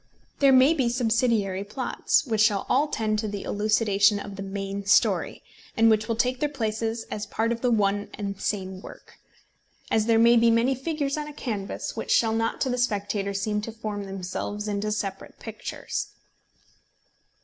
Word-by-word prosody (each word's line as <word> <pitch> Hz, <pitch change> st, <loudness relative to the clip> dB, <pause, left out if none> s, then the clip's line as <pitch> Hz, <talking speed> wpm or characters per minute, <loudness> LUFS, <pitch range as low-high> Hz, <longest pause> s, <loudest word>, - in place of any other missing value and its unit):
There 275 Hz, -1 st, +6 dB
may 260 Hz, +4 st, +6 dB
be 265 Hz, -7 st, +1 dB
subsidiary 230 Hz, -5 st, +1 dB
plots, 250 Hz, +8 st, 0 dB
which 220 Hz, -4 st, 0 dB
shall 210 Hz, -2 st, +3 dB
all 280 Hz, +4 st, +2 dB
tend 215 Hz, -6 st, -1 dB
to 215 Hz, -, -2 dB
the 205 Hz, -1 st, -5 dB
elucidation 205 Hz, -1 st, +2 dB
of 200 Hz, -1 st, -8 dB
the 195 Hz, -, -7 dB
main 195 Hz, 0 st, -4 dB
story, 210 Hz, -, +2 dB, 0.3 s
and 225 Hz, 0 st, +5 dB
which 215 Hz, 0 st, +1 dB
will 230 Hz, -, 0 dB
take 250 Hz, +2 st, 0 dB
their 295 Hz, -, 0 dB
places 225 Hz, -3 st, -2 dB
as 210 Hz, -, -4 dB
part 225 Hz, +1 st, -1 dB
of 235 Hz, +1 st, -3 dB
one 205 Hz, -4 st, +1 dB
and 200 Hz, -1 st, -4 dB
the -, -, -15 dB
same 190 Hz, -2 st, -3 dB
work, -, -, -13 dB, 0.7 s
as 220 Hz, 0 st, +2 dB
there 230 Hz, -1 st, +4 dB
may 235 Hz, +1 st, +6 dB
be 230 Hz, 0 st, +5 dB
many 230 Hz, +3 st, +3 dB
figures 285 Hz, +1 st, -2 dB
on 300 Hz, 0 st, -4 dB
a 300 Hz, -, -8 dB
canvas 210 Hz, -8 st, -4 dB
which -, -, -5 dB
shall 225 Hz, -1 st, +3 dB
not 225 Hz, 0 st, -1 dB
to 265 Hz, -, +1 dB
the 250 Hz, -, -1 dB
spectator 200 Hz, -3 st, -1 dB
seem 210 Hz, +1 st, -1 dB
to 230 Hz, -, -6 dB
form 215 Hz, -2 st, -5 dB
themselves 195 Hz, +2 st, -5 dB
into 210 Hz, +1 st, -2 dB
separate 195 Hz, -2 st, -4 dB
pictures. -, -, -5 dB
220 Hz, 180 wpm, -26 LUFS, 205-235 Hz, 0.7 s, There